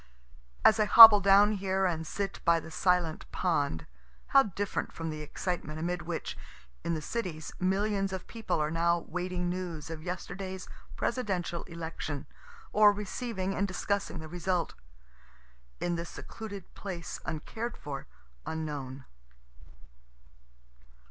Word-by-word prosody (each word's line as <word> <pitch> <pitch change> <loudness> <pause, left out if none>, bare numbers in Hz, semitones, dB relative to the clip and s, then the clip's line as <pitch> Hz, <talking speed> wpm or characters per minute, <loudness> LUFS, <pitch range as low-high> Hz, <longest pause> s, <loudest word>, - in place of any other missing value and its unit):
As 220 0 +7
I 215 - +4
hobble 220 0 +12
down 200 +1 +6
here 190 -1 0
and 165 -3 -1
sit 195 +2 -3
by 170 -1 +4
the 160 0 -10
silent 180 -2 0
pond, 145 - 0 0.4
how 275 - +7
different 205 -3 -3
from 165 -1 -4
the 155 0 -6
excitement 155 0 -4
amid 175 +2 -2
which, 170 -1 -4 0.5
in 170 - 0
the 155 - -5
cities, 170 -7 -4
millions 195 +1 +1
of 190 -1 -5
people 225 -7 -3
are 150 0 0
now 170 +1 +2
waiting 180 +1 -2
news 175 -3 -4
of 160 -1 -6
yesterday's 185 +2 -5 0.3
Presidential 190 -8 -1
election, 160 -4 -5 0.5
or 210 -1 +7
receiving 205 -1 -3
and 200 - 0
discussing 200 0 -2
the 160 -1 -7
result 175 +1 -1 1.1
in 175 - -1
this 170 0 -5
secluded 200 -4 -9
place 180 -4 -6
uncared 220 +9 -4
for, 140 -2 -7 0.4
unknown. 145 -4 -5
180 Hz, 130 wpm, -30 LUFS, 160-200 Hz, 1.1 s, hobble